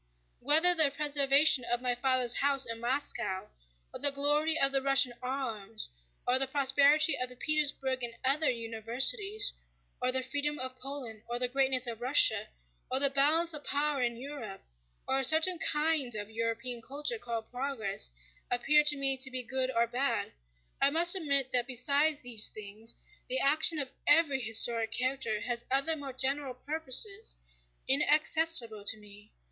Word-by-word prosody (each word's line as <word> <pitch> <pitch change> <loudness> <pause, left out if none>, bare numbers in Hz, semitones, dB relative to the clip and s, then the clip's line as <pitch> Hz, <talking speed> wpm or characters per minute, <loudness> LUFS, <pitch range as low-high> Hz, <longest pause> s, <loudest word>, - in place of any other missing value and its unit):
Whether 315 +6 +4
the 315 -4 +4
preservation 285 -1 +3
of 240 0 -2
my 250 0 -1
father's 250 -1 0
house 275 -1 0
in 230 -1 -4
Moscow, 235 -6 -3 0.4
or - - -8
the - - +6
glory 295 +3 +1
of 275 0 +3
the 270 0 +1
Russian 275 -2 +3
arms, 225 - -3 0.4
or 250 +1 +4
the 270 - +4
prosperity 285 +3 +3
of 255 0 -1
the 250 - -10
Petersburg 275 -2 -1
and 235 -1 -6
other 290 +4 +2
universities, 255 - +1 0.5
or 250 0 +1
the 260 0 0
freedom 290 +3 -3
of 255 -1 -6
Poland 255 -5 -8
or 240 - -3
the 250 0 0
greatness 265 0 0
of 235 -1 -7
Russia, 230 -5 +3 0.4
or 260 - +2
the 280 0 +5
balance 310 +5 +2
of 300 -1 -3
power 285 -1 -1
in 235 -1 -2
Europe, 250 -7 -9 0.4
or 265 0 0
a - - -1
certain 320 +6 +4
kind 300 -7 0
of 210 0 -6
European 230 +2 -4
culture 290 - -4
called 230 - -7
"progress" 245 - -1 0.4
appear 295 +5 +2
to 300 -1 +5
me 270 -1 0
to 265 +1 +1
be 255 -1 -4
good 260 +2 -2
or 235 -2 0
bad, 250 +4 -3 0.5
I 275 - +4
must 340 +5 +4
admit 280 -7 0
that 245 -1 0
besides 280 +4 0
these 235 -3 +1
things 215 +2 -2 0.3
the - - -1
action 315 +3 +1
of 275 -3 -3 0.2
every 290 -3 +3
historic 225 0 +3
character 250 -4 -2
has 240 0 -4
other 275 +5 +1
more 285 -3 -8
general 265 0 -2
purposes 320 - +1 0.5
inaccessible 300 -5 +1
to 220 - 0
me. 210 0 -17
265 Hz, 165 wpm, -29 LUFS, 240-290 Hz, 0.5 s, the